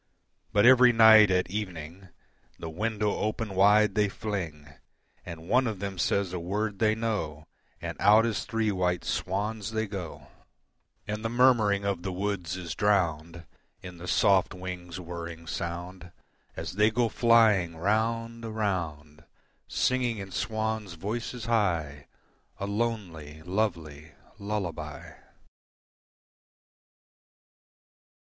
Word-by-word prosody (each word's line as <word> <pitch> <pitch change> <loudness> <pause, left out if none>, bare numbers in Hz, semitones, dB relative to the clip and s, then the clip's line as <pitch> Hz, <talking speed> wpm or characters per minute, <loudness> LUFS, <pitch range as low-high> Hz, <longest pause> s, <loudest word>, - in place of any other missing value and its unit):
But 105 +1 +4
every 125 0 +7
night 110 -2 +8
at 90 -1 +1
evening. 95 -3 -6 0.5
The 80 - -7
window 105 +3 -1
open 110 -1 -2
wide 105 +2 +4
they 105 0 +2
fling, 85 -9 -5 0.6
And 85 0 -9
one 125 +4 +3
of 110 -3 -3
them 95 -1 -5
says 100 -1 0
a 90 - -2
word 100 +4 -3
they 110 -1 +3
know 100 -10 -3 0.3
And - - -6
out 105 +3 +6
as 115 -2 -2
three 110 -2 0
white 90 -2 -1
swans 105 +3 -2
they 110 0 0
go, 95 -5 -7 0.8
And 105 +1 -4
the 115 - -1
murmuring 115 -5 +3
of 100 -3 -1
the 95 +1 -4
woods 90 -2 -3
is 85 -3 -5
drowned 85 -4 0 0.4
In 90 -2 -9
the 90 - -8
soft 95 -1 +3
wings' 90 -1 -7
whirring 85 -1 -7
sound, 85 +2 -6 0.4
As - - -5
they 105 +1 +5
go 120 +1 +1
flying 110 - +3
round, 115 +5 -1
around, 85 -9 -3 0.4
Singing 125 -3 0
in 95 -1 -7
swans' 110 -1 -3
voices 115 +5 -5
high 85 - -1 0.5
A 100 - -2
lonely, 100 -9 -4
lovely 85 -6 -3 0.3
lullaby. 85 -9 -5
100 Hz, 120 wpm, -28 LUFS, 85-110 Hz, 0.8 s, night